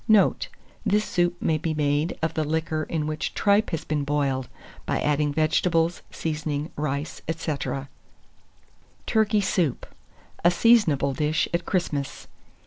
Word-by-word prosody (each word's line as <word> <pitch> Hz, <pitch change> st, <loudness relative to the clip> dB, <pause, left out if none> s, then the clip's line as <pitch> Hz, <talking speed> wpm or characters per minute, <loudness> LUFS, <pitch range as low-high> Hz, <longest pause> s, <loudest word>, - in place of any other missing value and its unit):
Note. 215 Hz, -2 st, +4 dB, 0.4 s
This 210 Hz, 0 st, +2 dB
soup 175 Hz, 0 st, 0 dB
may 155 Hz, -1 st, +1 dB
be 160 Hz, 0 st, -2 dB
made 150 Hz, +2 st, 0 dB
of 160 Hz, -, +1 dB
the 155 Hz, -, 0 dB
liquor 155 Hz, 0 st, -1 dB
in 155 Hz, -2 st, -1 dB
which 155 Hz, 0 st, -3 dB
tripe 205 Hz, +1 st, +3 dB
has 165 Hz, -2 st, -3 dB
been 150 Hz, -2 st, -1 dB
boiled, 140 Hz, -3 st, 0 dB, 0.4 s
by -, -, 0 dB
adding 150 Hz, 0 st, +1 dB
vegetables, 165 Hz, +2 st, +1 dB
seasoning, 150 Hz, -1 st, -3 dB
rice, 145 Hz, 0 st, -3 dB
&c. 160 Hz, -1 st, -1 dB, 1.5 s
TURKEY 215 Hz, -2 st, +2 dB
SOUP 175 Hz, -8 st, 0 dB, 0.6 s
(a 175 Hz, -, +7 dB
Seasonable 175 Hz, -, +4 dB
Dish 150 Hz, +3 st, +1 dB
at 170 Hz, 0 st, -1 dB
Christmas). 150 Hz, -7 st, -2 dB
155 Hz, 135 wpm, -25 LUFS, 150-175 Hz, 1.5 s, a